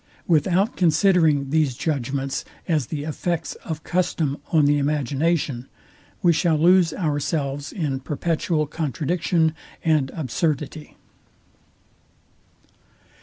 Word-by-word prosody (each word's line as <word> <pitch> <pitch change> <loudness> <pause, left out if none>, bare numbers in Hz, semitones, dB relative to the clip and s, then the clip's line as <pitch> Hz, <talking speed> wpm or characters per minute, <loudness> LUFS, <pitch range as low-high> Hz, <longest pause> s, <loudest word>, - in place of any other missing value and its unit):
Without 180 - +2
considering 160 -5 +3
these 150 -5 +2
judgments 135 -1 -2 0.2
as 155 -8 +1
the 145 +1 -4
effects 160 +2 -2
of 160 -1 -5
custom 170 -5 0
on 155 -3 +4
the 145 0 +3
imagination, 145 -1 0 0.6
we 175 -1 +5
shall 165 -1 +2
lose 175 +1 +5
ourselves 145 -3 -2
in 145 -7 -2
perpetual 155 +3 -1
contradiction 160 +2 0 0.3
and 155 -4 +2
absurdity. 150 +1 -2
155 Hz, 95 wpm, -23 LUFS, 140-170 Hz, 0.6 s, we